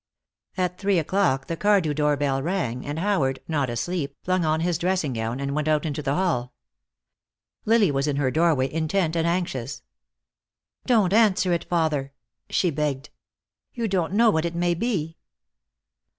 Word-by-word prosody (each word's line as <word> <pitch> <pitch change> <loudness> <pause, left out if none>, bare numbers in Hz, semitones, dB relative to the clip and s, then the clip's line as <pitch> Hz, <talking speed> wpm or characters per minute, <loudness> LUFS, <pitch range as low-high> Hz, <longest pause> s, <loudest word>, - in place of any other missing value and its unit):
At 180 -1 -1
three 200 -2 +2
o'clock 165 -5 +1
the 165 - -3
Cardew 195 -5 +2
doorbell 145 -2 +1
rang, 140 -7 -2
and 145 +2 -3
Howard, 160 -8 +1
not 145 -5 0
asleep, 140 +4 -3
flung 185 -1 +1
on 155 0 +1
his 170 -1 0
dressing 180 -6 0
gown 115 +2 -3
and 140 0 -2
went 150 +1 -1
out 155 -1 +2
into 150 -1 -3
the 140 0 -1
hall. 145 -10 -1 1.1
Lily 220 -5 +4
was 140 +1 0
in 145 - 0
her 135 -2 +1
doorway, 155 -4 +2
intent 160 +1 0
and 165 0 +1
anxious. 170 -8 -2 1.0
"Don't 215 -7 +3
answer 200 -5 +3
it, 170 - -1
father," 155 -5 -1 0.4
she 180 - +1
begged. 150 -1 -2 0.6
"You 235 -2 -1
don't 185 -3 -1
know 225 +2 +5
what 160 -3 0
it 170 0 -3
may 175 0 +1
be." 170 -5 -2
160 Hz, 160 wpm, -24 LUFS, 140-185 Hz, 1.1 s, know